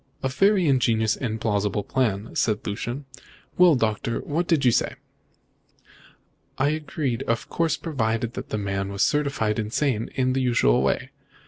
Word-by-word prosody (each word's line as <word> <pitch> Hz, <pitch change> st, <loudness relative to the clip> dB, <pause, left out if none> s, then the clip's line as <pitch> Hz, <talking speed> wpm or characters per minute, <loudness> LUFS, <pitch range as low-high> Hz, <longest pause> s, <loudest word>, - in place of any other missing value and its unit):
"A 135 Hz, -, +1 dB
very 195 Hz, +6 st, +3 dB
ingenious 115 Hz, -5 st, +2 dB
and 110 Hz, -3 st, -3 dB
plausible 105 Hz, -2 st, 0 dB
plan," 110 Hz, -3 st, -1 dB
said 110 Hz, -1 st, 0 dB
Lucian. 120 Hz, +7 st, -4 dB, 0.5 s
"Well, 180 Hz, -4 st, +7 dB
Doctor, 115 Hz, -1 st, -1 dB
and -, -, -5 dB
what 165 Hz, +4 st, -1 dB
did 155 Hz, -6 st, +2 dB
you 125 Hz, -, +6 dB
say?" -, -, 0 dB, 1.6 s
"I 135 Hz, +2 st, +2 dB
agreed, 150 Hz, -5 st, -2 dB
of 115 Hz, -1 st, -1 dB
course, 165 Hz, -1 st, 0 dB
provided 115 Hz, -6 st, -2 dB
the -, -, -4 dB
man 100 Hz, -1 st, -2 dB
was 100 Hz, 0 st, 0 dB
certified 140 Hz, -7 st, 0 dB
insane 115 Hz, +1 st, -1 dB
in 130 Hz, -1 st, +1 dB
the 135 Hz, -, 0 dB
usual 115 Hz, -, +3 dB
way. -, -, -1 dB
120 Hz, 150 wpm, -24 LUFS, 110-140 Hz, 1.6 s, Well